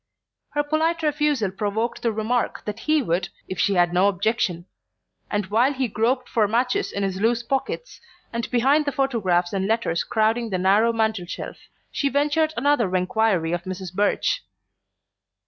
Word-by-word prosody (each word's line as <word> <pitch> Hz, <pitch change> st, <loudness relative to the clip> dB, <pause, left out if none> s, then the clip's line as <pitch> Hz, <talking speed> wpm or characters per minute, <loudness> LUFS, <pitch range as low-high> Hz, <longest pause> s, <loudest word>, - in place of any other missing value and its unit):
Her 295 Hz, 0 st, +1 dB
polite 320 Hz, +2 st, 0 dB
refusal 295 Hz, -8 st, +1 dB
provoked 210 Hz, +4 st, -2 dB
the 230 Hz, -, +1 dB
remark 225 Hz, +3 st, -1 dB
that 210 Hz, 0 st, -4 dB
he 310 Hz, -2 st, +1 dB
would, 180 Hz, -2 st, -1 dB, 0.2 s
if 185 Hz, -, -5 dB
she'd 175 Hz, -3 st, +3 dB
no 185 Hz, +3 st, +4 dB
objection; 190 Hz, -3 st, 0 dB, 0.6 s
and 205 Hz, -2 st, -1 dB
while 230 Hz, +8 st, +2 dB
he 260 Hz, -2 st, -1 dB
groped 245 Hz, +4 st, 0 dB
for 215 Hz, -3 st, +2 dB
matches 245 Hz, +4 st, 0 dB
in 200 Hz, -, -2 dB
his 190 Hz, 0 st, -2 dB
loose 235 Hz, +1 st, +2 dB
pockets, 270 Hz, -, -3 dB, 0.3 s
and 235 Hz, 0 st, -3 dB
behind 270 Hz, +5 st, +3 dB
the 285 Hz, -, 0 dB
photographs 205 Hz, -11 st, 0 dB
and 195 Hz, -1 st, 0 dB
letters 220 Hz, -6 st, 0 dB
crowding 225 Hz, +1 st, +1 dB
the 190 Hz, -, -1 dB
narrow 200 Hz, +5 st, +3 dB
mantel 220 Hz, -5 st, -1 dB
shelf, -, -, -6 dB, 0.3 s
she 280 Hz, -, 0 dB
ventured 295 Hz, +3 st, +1 dB
another 235 Hz, -7 st, +2 dB
enquiry 185 Hz, -2 st, +1 dB
for 175 Hz, +2 st, -7 dB
Mrs. 185 Hz, -1 st, -6 dB
Birch. 205 Hz, -, +1 dB
220 Hz, 160 wpm, -23 LUFS, 190-265 Hz, 0.6 s, no